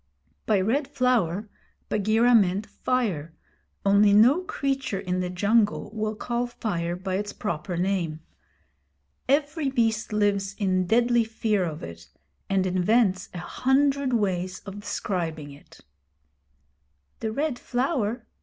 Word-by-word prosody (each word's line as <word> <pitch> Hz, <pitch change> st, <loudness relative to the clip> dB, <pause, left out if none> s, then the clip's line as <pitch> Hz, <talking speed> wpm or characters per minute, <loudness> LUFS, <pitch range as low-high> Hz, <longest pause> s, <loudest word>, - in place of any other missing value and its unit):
By 210 Hz, -3 st, +3 dB
Red 255 Hz, +9 st, 0 dB
Flower 230 Hz, -, +1 dB, 0.4 s
Bagheera 220 Hz, +4 st, +3 dB
meant 200 Hz, -2 st, +3 dB
fire, 180 Hz, -15 st, -2 dB, 0.5 s
only 200 Hz, +1 st, +5 dB
no 245 Hz, -, +6 dB
creature 270 Hz, -, -2 dB
in 180 Hz, 0 st, -2 dB
the 180 Hz, -1 st, -2 dB
jungle 205 Hz, +3 st, +1 dB
will 215 Hz, 0 st, -2 dB
call 240 Hz, +2 st, -2 dB
fire 175 Hz, -8 st, -3 dB
by 185 Hz, +1 st, -3 dB
its 205 Hz, 0 st, -4 dB
proper 175 Hz, -2 st, -4 dB
name. 175 Hz, -4 st, -1 dB, 1.1 s
Every 290 Hz, +1 st, +1 dB
beast 225 Hz, -4 st, 0 dB
lives 200 Hz, -2 st, 0 dB
in 185 Hz, -3 st, +1 dB
deadly 240 Hz, +2 st, +3 dB
fear 220 Hz, -3 st, 0 dB
of 155 Hz, -2 st, -6 dB
it, 85 Hz, 0 st, -9 dB, 0.4 s
and 195 Hz, -1 st, +2 dB
invents 185 Hz, +1 st, +2 dB
a -, -, -8 dB
hundred 270 Hz, +5 st, +1 dB
ways 185 Hz, -5 st, -1 dB
of 200 Hz, 0 st, -8 dB
describing 170 Hz, -7 st, -3 dB
it. 140 Hz, +1 st, -16 dB, 1.4 s
'The 220 Hz, -, -2 dB
Red 280 Hz, +1 st, -2 dB
Flower?' 245 Hz, -3 st, -1 dB
210 Hz, 125 wpm, -26 LUFS, 185-240 Hz, 1.4 s, no